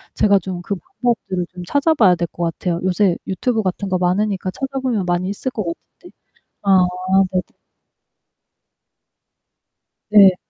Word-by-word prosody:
제가 200 -2 +4
좀 180 -1 -6
그 200 - -2
방법들을 190 -2 -2
좀 180 - -8
찾아봐야 285 - +4
될 170 0 -2
것 175 - -5
같아요. 170 +1 -2
요새 185 -1 +2
유튜브 220 +4 0
같은 190 +1 -2
거 185 - +1
많으니까 185 +1 0
찾아보면 260 -5 -2
많이 175 +2 0
있을 205 +6 -3
것 215 -7 -4
같은데 170 - -9 0.5
아 190 -2 +4 0.5
네네. 185 - +1 2.7
네. 195 -3 +8
190 Hz, 265 characters per minute, -19 LUFS, 180-215 Hz, 2.7 s, 네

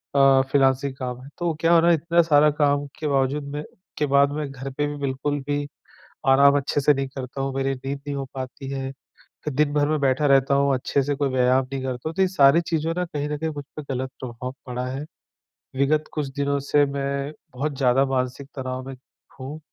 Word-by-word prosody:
अ, 135 -1 +6
freelancing 135 -1 +2
काम 125 -2 -5
है। 135 - -11
तो 175 -2 0
क्या 165 +1 +3
हुआ 170 -1 +6
ना 170 - +5
इतना 170 +1 +3
सारा 150 -2 +5
काम 145 0 +3
के 155 - -2
बावजूद 140 +1 +1
मैं 150 - -3 0.3
के 150 - +1
बाद 140 0 +4
मैं 150 -1 -3
घर 135 0 -6
पे 145 +2 -1
भी 145 - -4
बिल्कुल 140 +1 -2
भी 145 0 -1 0.6
आराम 140 +1 +6
अच्छे 140 +1 0
से 145 +1 +5
नहीं 135 0 -2
करता 135 0 -6
हूँ, 135 0 -2
मेरी 135 0 0
नींद 135 +2 -5
नहीं 140 - -2
हो 135 - -3
पाती 135 +1 -6
है। 135 -1 -3 0.5
तो 150 - -1
दिन 145 +1 +1
भर 145 0 +2
में 155 0 +1
बैठा 140 +2 +2
रहता 135 0 +4
हूँ 140 0 +3
अच्छे 135 +2 0
से 145 +2 -1
कोई 140 0 0
व्यायाम 130 +1 +3
नहीं 135 -1 -3
करता 130 +2 -3
हूँ। 160 - -6
तो 190 - +2
ये 190 - +3
सारी 165 -3 +5
चीज़ों 165 -1 -1
ना 180 - 0
कहीं 150 -3 -4
न 150 - -2
कहीं 160 +1 -2
मुझ 145 -2 -7
पे 155 - -4
गलत 130 +1 -3
प्रभाव 125 0 -6
पड़ा 125 0 -3
है। 135 +3 -4 0.7
विगत 145 +3 +2
कुछ 150 -2 -2
दिनों 140 0 0
से 145 +1 +3
मैं 140 +1 -3 0.2
बहुत 140 +2 -2
ज़्यादा 130 0 +3
मानसिक 130 0 -2
तनाव 130 -1 -4
में 135 - -6 0.4
हूँ, 140 +4 -6
140 Hz, 220 wpm, -24 LUFS, 135-150 Hz, 0.7 s, अ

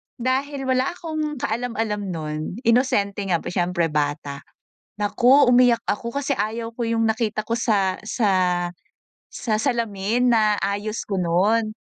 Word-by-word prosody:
dahil 270 +3 -1
wala 260 +5 +1
akong 310 -3 -4
kaalam-alam 225 -2 -2
nun, 155 -4 -4 0.2
inosente 210 -5 +2
nga 170 -3 +1
siyempre 175 -1 0
bata. 145 -1 -2 0.5
Naku 245 +7 +4
umiyak 245 -2 +5
ako 235 +3 -3
kasi 280 - -1
ayaw 225 +3 -2
ko 235 0 -3
yung 230 0 +1
nakita 220 -1 0
ko - - -5
sa 200 -6 +1
sa 215 -2 +1 1.0
sa 215 -2 -2
salamin 235 -1 0
na 215 -2 +3
ayos 205 +2 -2
ko 195 -2 -2
nun. 200 +6 +2
220 Hz, 130 wpm, -23 LUFS, 200-245 Hz, 1.0 s, umiyak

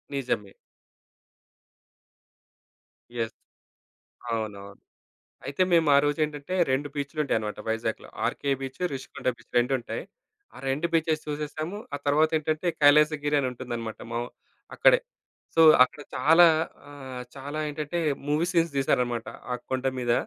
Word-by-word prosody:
నిజమే. 120 -7 -2 2.7
యెస్. 115 -1 -2 1.0
అవునవును. 105 -3 -4 0.7
అయితే 140 +7 0
మేమారోజేంటంటే, 150 0 +2 0.2
2 135 +3 0
బీచులుంటాయన్నమాట 140 -8 -2
వైజాగ్‌లో. 110 0 -2 0.2
RK 140 - -1
beach, 135 +2 -7
Rishikonda 130 -1 -5
beach - - -22
రెండుంటాయి. 120 -2 -1 0.5
ఆ - - -11
2 145 +5 0
బీచెస్ 160 -1 +1
చూసేసాము. 150 +4 -4 0.2
ఆ - - 0
తరువాతేంటంటే 155 +2 +2
కైలాసగిరి 150 0 +5
అని 130 - 0
ఉంటుందన్నమాట. 120 -3 -5
మా 115 - -1 0.6
అక్కడే. - - +6 0.6
సో, 165 - +6 0.2
అక్కడ 145 - -10 0.2
చాలా 165 +3 +7 0.4
ఆహ్, 130 -3 -8
చాలా 140 +3 -6
ఏంటంటే, 150 +3 -3 0.3
మూవీ 150 +3 +2
సీన్స్ 170 -3 +2
తీశారన్నమాట 125 -3 0 0.2
ఆ - - +1 0.2
కొండ 130 0 -1
మీద. 120 -1 +1
140 Hz, 105 wpm, -27 LUFS, 125-155 Hz, 2.7 s, చాలా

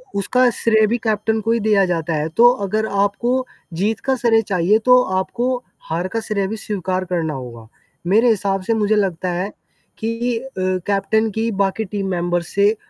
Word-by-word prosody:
उसका 250 +6 +2
श्रेय 220 -1 +4
भी 235 +3 0
कैप्टन 220 0 0
को 225 +2 0
ही 230 - +2
दिया 210 -2 +3
जाता 170 -2 -1
है। 150 +1 -1
तो 240 +1 +8 0.2
अगर 215 +3 0
आपको 210 +6 0 0.3
जीत 200 +6 -1
का 265 -1 +2
श्रेय 230 -3 +3
चाहिए 195 +1 +2
तो 250 0 +8 0.2
आपको 245 +6 -1 0.3
हार 170 +3 -1
का 225 - -2
श्रेय 205 -3 -1
भी 220 +3 -4
स्वीकार 185 -3 -3
करना 170 -4 -2
होगा। 120 -4 -8 0.4
मेरे 220 +6 +4
हिसाब 195 -3 0
से 230 - 0
मुझे 215 -1 +1
लगता 185 -3 0
है 185 +4 -3 0.5
कि 230 +2 -1
अ, 230 - -6 0.4
कैप्टन 205 +2 +1
की 225 +2 -1
बाकी 195 +3 -1
टीम 195 0 -4
मेंबर्स 175 -1 -1
से 200 +2 +4
205 Hz, 180 wpm, -20 LUFS, 185-225 Hz, 0.5 s, तो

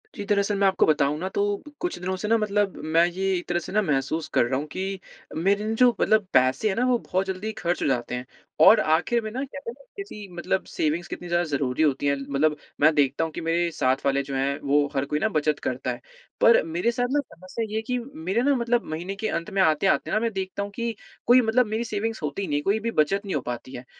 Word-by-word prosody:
जी, 205 - -5
दरअसल, 200 0 +2
मैं 200 - +4
आपको 190 - +3
बताऊँ 150 -1 +2
ना, 185 - -3
तो 200 +1 -1 0.2
कुछ 355 +1 -2
दिनों 185 +1 -2
से 200 +3 -4
ना, 230 +1 +4
मतलब 205 -2 0 0.2
मैं 170 - +7
ये 190 +2 -1
एक 175 - -7
तरह 175 -1 +1
से - - -8
ना 215 +1 +3
महसूस 155 -1 -1
कर - - +4
रहा 130 +2 -1
हूँ 145 - -4
कि 190 +1 -3 0.4
मेरे 200 +6 +1
ना, 220 - -1
जो 250 +2 +5
मतलब 215 -3 +3
पैसे 130 +11 +3
हैं 190 - -1
ना, 245 - +1
वो 250 -1 +3
बहुत 190 -2 -1
जल्दी 190 +3 -3
खर्च 175 +1 -1
हो - - +1
जाते 125 -2 -1
हैं 125 +1 -5 0.4
और 220 - +8
आखिर 175 +10 +2
में 215 - -4
ना, 260 +4 -3
कहते 275 -2 -7
हैं - - -6
ना, 275 - -18
किसी 215 - -7
मतलब 180 +2 -1
सेविंग्स 160 +3 -1
कितनी 175 - -7
ज़्यादा 175 0 +1
ज़रूरी 140 0 0
होती 145 -2 +1
हैं। 140 - +3 0.2
मतलब 150 +2 +2 0.3
मैं 155 +2 +6
देखता 145 +1 +2
हूँ 160 - -3
कि - - -5
मेरे 170 +1 +1
साथ 130 -3 0
वाले 140 0 +2
जो 135 0 -5
हैं, 135 +1 0
वो 145 +1 +2
हर 135 0 +1
कोई 150 +1 -1
ना 220 - +1
बचत 155 -5 0
करता 130 0 -2
है। 120 - -7 0.4
पर 230 - +7
मेरे 170 +8 0
साथ 245 +1 -1
ना, 290 - +2
समस्या 185 +6 -6
ये 215 - -5
है 220 - 0
कि 250 +2 -2
मेरे 230 -4 -3
ना, 280 +1 +3
मतलब 240 -1 +1
महीने 175 +5 -4
के 220 +2 -3
अंत 170 - -3
में 195 - +2
आते-आते 170 +2 +2
ना, 215 - +2
मैं 230 0 -1
देखता 190 +1 -3
हूँ 205 - -6
कि 235 -1 -2 0.3
कोई 250 +1 +7
मतलब 235 +2 +3
मेरी 220 +2 -2
सेविंग्स 220 -1 -3
होती 160 +6 -3
नहीं 145 - 0
है, - - -1
कोई 205 +3 +1
भी 230 +2 -2
बचत 195 +7 0
नहीं 195 - -3
हो 145 - 0
पाती 125 +1 -6
है 125 0 -8
185 Hz, 260 wpm, -25 LUFS, 150-215 Hz, 0.4 s, और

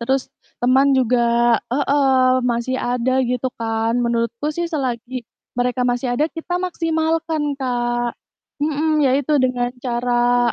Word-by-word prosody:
terus 265 +3 0 0.3
teman 265 +3 +4
juga 250 -2 +2 0.5
heeh, 280 0 +2 0.3
masih 245 +1 0
ada 255 +1 0
gitu 250 +1 -1
kan. 225 0 -1
Menurutku 235 +5 -1
sih 340 +2 -2
selagi 255 -5 -3 0.3
mereka 250 +1 0
masih 245 0 -1
ada 295 +6 +1
kita 350 +2 -4
maksimalkan, 320 -4 -1
Kak. 240 -2 -1 0.5
Mhm, 305 +1 +1
ya 275 -3 +3
itu 285 +2 -1
dengan 245 -1 0
cara 245 -1 +1
255 Hz, 125 wpm, -20 LUFS, 240-290 Hz, 0.5 s, teman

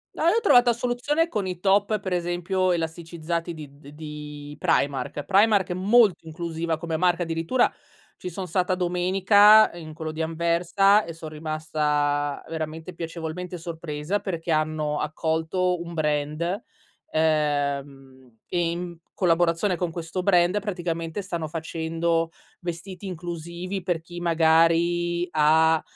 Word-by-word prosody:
No, - - -3
io 375 +7 +4
ho - - +1
trovata 245 - +5
soluzione 250 +7 0
con 210 - -2
i 180 -2 -4
top 200 +3 +2
per 190 -2 -3
esempio 175 +1 0
elasticizzati 170 0 -3
di 145 -3 -11
de 145 0 -14
di 150 -1 -8
Primark. 140 0 0
Primark 200 +2 +3
è - - -1
molto 200 -1 +4
inclusiva 165 0 -3
come 165 -1 -2
marca 180 +1 +2
addirittura, 165 +9 +1 0.5
ci 180 - -6
son 185 +2 -5
stata 180 +2 0
domenica 195 +4 +5
in 160 -2 -9
quello 160 0 -5
di 160 +1 -3
Anversa 170 +5 +3
e 165 - -7
so' 165 0 -9
rimasta 150 -2 -1
veramente 160 +2 -5
piacevolmente 170 +2 -5
sorpresa, 165 +2 -3
perché 170 -4 -4
hanno 155 -1 0
accolto 160 +4 -1
un 170 0 -7
brand, 155 +5 -1 0.5
ehm, 140 -5 -1
e 175 -1 0
in 175 0 -5 0.2
collaborazione 175 +1 +2
con 175 0 -2
questo 170 +2 -4
brand 180 +1 +3
praticamente 175 -3 -3
stanno 170 -5 -4
facendo 165 +1 -1 0.3
vestiti 175 +2 -6
inclusivi 175 +1 -5
per 175 -2 -1
chi 175 +1 -9
magari 170 +1 +2
ha 160 +1 +4
170 Hz, 130 wpm, -25 LUFS, 155-180 Hz, 0.5 s, trovata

